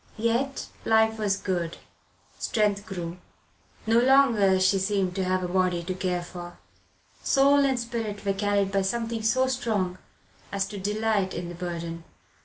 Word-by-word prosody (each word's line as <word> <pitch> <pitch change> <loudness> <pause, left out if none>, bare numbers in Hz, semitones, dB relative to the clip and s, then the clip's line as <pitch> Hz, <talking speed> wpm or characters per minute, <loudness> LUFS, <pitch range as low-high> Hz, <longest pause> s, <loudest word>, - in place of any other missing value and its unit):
Yet 235 +5 0 0.2
life 220 0 +3
was 200 -2 +1
good; 175 -4 -2 0.6
strength 205 -2 0
grew. 175 -3 -5 0.7
No 225 +1 +4
longer 235 -7 +4
she 185 +1 +3
seemed 190 -1 0
to 190 - 0
have 185 0 0
a - - -1
body 180 -1 +1
to 185 +2 -3
care 180 -1 -2
for. 175 0 -9 0.6
Soul 280 +1 +4
and 265 -2 +1
spirit 230 -4 -4
were 200 - +2
carried 200 0 +1
by 195 0 +2
something 230 +3 -2
so 255 +4 +2
strong 215 -8 -1 0.5
as 195 -1 0
to 205 -1 -6
delight 210 -1 0
in 175 0 -4
the - - -6
burden. 170 -1 -5
200 Hz, 155 wpm, -26 LUFS, 185-225 Hz, 0.7 s, No